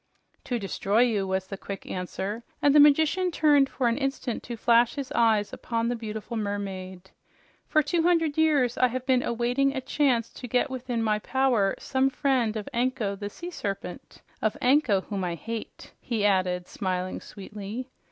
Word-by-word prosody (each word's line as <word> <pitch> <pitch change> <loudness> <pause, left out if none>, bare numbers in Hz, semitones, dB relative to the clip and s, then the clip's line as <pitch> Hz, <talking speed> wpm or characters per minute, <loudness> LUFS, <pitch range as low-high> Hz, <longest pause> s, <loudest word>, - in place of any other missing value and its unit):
"To 245 - -1
destroy 200 +1 0
you," 215 -6 +2
was 190 0 -1
the 195 +1 -7
quick 195 -1 -7
answer, 190 +4 -4 0.2
and 285 - +4
the 300 - +7
magician 315 +5 +5
turned 295 -4 +4
for 255 - 0
an 235 +3 +1
instant 270 -3 -2
to 235 -1 -7
flash 235 +1 +4
his 275 -3 -5
eyes 220 -3 +2
upon 230 0 -2
the 245 - 0
beautiful 220 0 -6
mermaid. 190 -3 -5 0.6
"For 310 -1 +3
two 330 +3 +1
hundred 330 -3 +2
years 290 -6 +2
I 255 - +5
have 255 +1 -4
been 260 -2 +3
awaiting 245 +4 0
a - - 0
chance 260 -3 +1
to 250 - -8
get 250 +4 +1
within 250 -3 -2
my 215 -1 +1
power 245 -5 +1
some 265 0 +1
friend 255 -6 0
of 210 - -6
Anko 240 -4 0
the 205 +1 -5
Sea 350 +11 -8
Serpent 195 - -6 0.2
of 215 - 0
Anko, 250 -7 +3
whom 195 -1 -4
I 175 -1 -2
hate!" 225 +7 -7
he 220 -4 -1
added, 185 -3 +1
smiling 185 -1 -3
sweetly. 210 +5 -8
235 Hz, 175 wpm, -27 LUFS, 205-265 Hz, 0.6 s, the